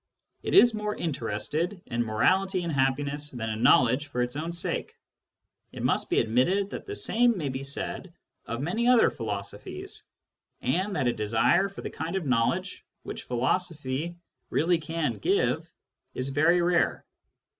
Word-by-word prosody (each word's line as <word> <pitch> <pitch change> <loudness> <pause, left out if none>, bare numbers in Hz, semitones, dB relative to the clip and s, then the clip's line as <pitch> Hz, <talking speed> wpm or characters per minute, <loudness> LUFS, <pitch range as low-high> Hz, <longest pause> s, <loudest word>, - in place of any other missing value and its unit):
It - - -1
is 240 -11 +8
more 210 -1 -2
interested 155 - -2
in 120 0 -1
morality 185 - +2
and 170 -2 -2
happiness 140 +2 0
than 115 -4 -4
in 110 +1 -4
knowledge 125 +3 +4
for 125 -3 -1
its 125 +1 -4
own 160 +3 -3
sake. 170 0 -2 0.8
It - - -7
must - - +1
be - - +3
admitted 180 - +2
that - - -7
the 410 - -4
same 240 - +2
may 150 -5 -2
be 130 +1 -4
said 140 +6 -4 0.4
of 115 +2 -3
many 220 - 0
other 250 -2 +6
philosophies, 100 -3 -5 0.6
and 185 +10 0
that 130 - 0
a 120 - +2
desire 110 - +2
for 195 - -9
the - - -5
kind 165 +3 -4
of 190 -4 -2
knowledge 115 -3 0 0.2
which - - -7
philosophy 150 +3 -1 0.3
really 170 +1 +2
can 165 0 -2
give 400 +4 +1 0.4
is 130 +1 -2
very 165 +5 +3
rare. 175 -1 +1
150 Hz, 155 wpm, -27 LUFS, 125-185 Hz, 0.8 s, is